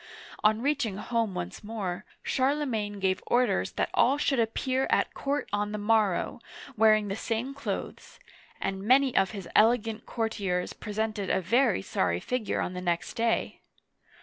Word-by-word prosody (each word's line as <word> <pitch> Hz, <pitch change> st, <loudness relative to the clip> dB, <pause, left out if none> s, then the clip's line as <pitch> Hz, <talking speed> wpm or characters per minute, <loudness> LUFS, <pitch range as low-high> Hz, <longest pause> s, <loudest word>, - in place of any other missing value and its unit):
On 215 Hz, +2 st, +3 dB
reaching 245 Hz, -9 st, 0 dB
home 225 Hz, -2 st, -1 dB
once 90 Hz, -, -5 dB
more, 205 Hz, -3 st, -4 dB, 0.2 s
Charlemagne 255 Hz, -7 st, 0 dB
gave 190 Hz, -1 st, +1 dB
orders 240 Hz, -, +2 dB
that -, -, -1 dB
all 270 Hz, +3 st, +4 dB
should 285 Hz, -3 st, +1 dB
appear 255 Hz, +4 st, 0 dB
at -, -, +2 dB
court 285 Hz, +1 st, -2 dB
on 205 Hz, 0 st, -1 dB
the -, -, -2 dB
morrow, 210 Hz, -1 st, +1 dB, 0.4 s
wearing 215 Hz, -1 st, +4 dB
the 195 Hz, -, -2 dB
same 230 Hz, +4 st, -2 dB
clothes; 280 Hz, -, -6 dB, 0.4 s
and 195 Hz, 0 st, -2 dB
many 260 Hz, +4 st, +4 dB
of 195 Hz, 0 st, +4 dB
his 195 Hz, -4 st, -7 dB
elegant 225 Hz, 0 st, +3 dB
courtiers 200 Hz, -6 st, -2 dB
presented 210 Hz, -1 st, -3 dB
a -, -, +2 dB
very 225 Hz, -, +2 dB
sorry 90 Hz, -3 st, 0 dB
figure 250 Hz, -, -2 dB
on 180 Hz, -, -3 dB
the 180 Hz, -, -5 dB
next 175 Hz, -1 st, -1 dB
day 230 Hz, 0 st, 0 dB
215 Hz, 150 wpm, -28 LUFS, 195-245 Hz, 0.4 s, all